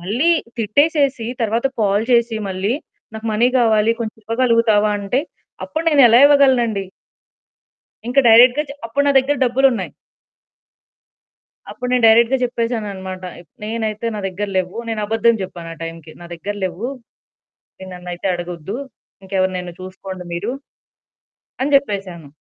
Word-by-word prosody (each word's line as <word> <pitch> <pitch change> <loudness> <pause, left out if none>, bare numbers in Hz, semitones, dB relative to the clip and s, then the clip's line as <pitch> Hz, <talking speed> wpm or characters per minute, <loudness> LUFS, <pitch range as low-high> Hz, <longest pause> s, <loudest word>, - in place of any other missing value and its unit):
మళ్ళీ 230 - 0 0.3
తిట్టేసేసి 275 +2 +1
తర్వాత 230 +3 0
కాల్ 205 +1 +1
చేసి 235 -1 +3
మళ్ళీ 190 +3 -1 0.4
"నాకు 220 +1 -6
మనీ 235 +4 +3
కావాలి 225 -1 +3
కొంచెం 220 -2 -4
ఇవ్వగలుగుతావా?" 230 -3 +2
అంటే 205 +7 0 0.5
అప్పుడు 320 +1 -4
నేనెలా 255 -6 +6
ఇవ్వగలనండి? 250 -8 +3 1.2
ఇంకా 275 +3 +4
డైరెక్ట్‌గా 245 +5 +7
చె 280 - -8
అప్పుడు 280 +5 0
నా 280 - +4
దగ్గర 275 +2 +1
డబ్బులున్నాయి. 255 0 +1 1.8
అప్పుడు 250 - -6
నేను 245 -2 +2
డైరెక్ట్‌గా 230 +3 +5
జెప్పేసాననమాట. 210 -6 -3 0.2
ఇప్ - - -20
నేనైతే 220 0 -3
నా 210 - -4
దగ్గర 200 +2 -4
లేవు. 185 +3 -3
నేను 225 -1 -2
అబద్ధం 225 +1 +2
జెప్పాను 175 -3 -8
ఆ - - -20
టైంకి. 165 -1 -9
నా 175 - -10
దగ్గర 205 +5 -5
లేవు. 185 +5 -4 0.9
మీరు 190 - -9
నన్నైతే 180 +1 -6
అడగొద్దు. 175 +3 -5 0.5
ఇంకెవరినైనా 185 -2 -2
చూసుకోండి 185 0 -8
మీరు? 200 +8 -3 1.1
అని 285 +2 0
జెప్పేసాను. 195 - -1
220 Hz, 125 wpm, -19 LUFS, 190-245 Hz, 1.8 s, డైరెక్ట్‌గా